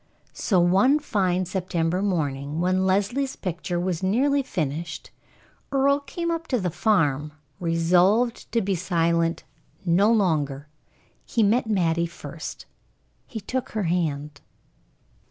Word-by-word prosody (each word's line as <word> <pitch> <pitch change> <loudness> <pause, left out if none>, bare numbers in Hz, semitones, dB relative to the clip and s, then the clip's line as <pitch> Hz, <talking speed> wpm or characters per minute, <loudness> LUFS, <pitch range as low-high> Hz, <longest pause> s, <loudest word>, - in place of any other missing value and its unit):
So 190 -5 +1
one 190 +11 +4
fine 185 -10 0
September 180 -1 -1
morning, 150 -6 -1
when 185 +2 +1
Leslie's 220 +9 0
picture 175 -1 -3
was 175 -1 -2
nearly 265 +9 +2
finished, 160 - -4 0.6
Earle 280 +1 +3
came 335 +5 -4
up 330 0 -3
to 250 - 0
the 180 -3 -1
farm, 155 -6 +1 0.3
resolved 180 +7 +2
to 230 -2 +1
be 195 +1 0
silent 170 -1 0 0.4
no 190 +5 +4
longer. 150 -9 +1 0.6
He 230 - 0
met 225 +3 +2
Mattie 170 -4 +1
first. 170 - -8 0.6
He 225 - -6
took 255 +6 -4
her 215 -2 -1
hand. 150 -4 -2
185 Hz, 120 wpm, -24 LUFS, 165-220 Hz, 0.6 s, one